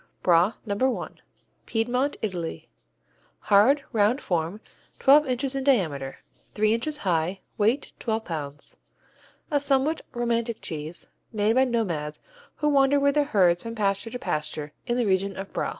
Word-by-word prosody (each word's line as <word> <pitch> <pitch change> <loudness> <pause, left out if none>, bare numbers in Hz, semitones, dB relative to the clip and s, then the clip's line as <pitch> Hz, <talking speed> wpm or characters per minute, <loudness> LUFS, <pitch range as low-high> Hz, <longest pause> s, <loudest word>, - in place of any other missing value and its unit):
Bra 175 +4 +4
No. 235 +5 0
I - - -8 0.6
Piedmont, 250 +5 0
Italy 175 - -4 0.7
Hard, 245 +8 +4
round 220 +3 +2
form, 175 - -2 0.4
twelve 290 +2 +6
inches 260 +1 -1
in 270 -1 -2
diameter, 160 - 0 0.3
three 215 +1 +3
inches 295 +7 -2
high, 180 - -1 0.2
weight 225 +7 +1
twelve 220 -1 -2
pounds. 145 -3 -6 0.7
A 290 - +3
somewhat 280 +3 +1
romantic 235 -1 -1
cheese, 155 0 -6 0.2
made 215 0 +2
by 260 +2 +4
nomads 175 - -2 0.4
who 300 - 0
wander 280 0 +4
with 280 0 +3
their 295 0 +2
herds 180 -9 +3
from 230 0 -4
pasture 200 +1 0
to 250 - -5
pasture 150 -6 -3
in 240 0 0
the 245 - +1
region 195 0 0
of 195 0 -7
Bra. - - -1
220 Hz, 150 wpm, -26 LUFS, 180-265 Hz, 0.7 s, twelve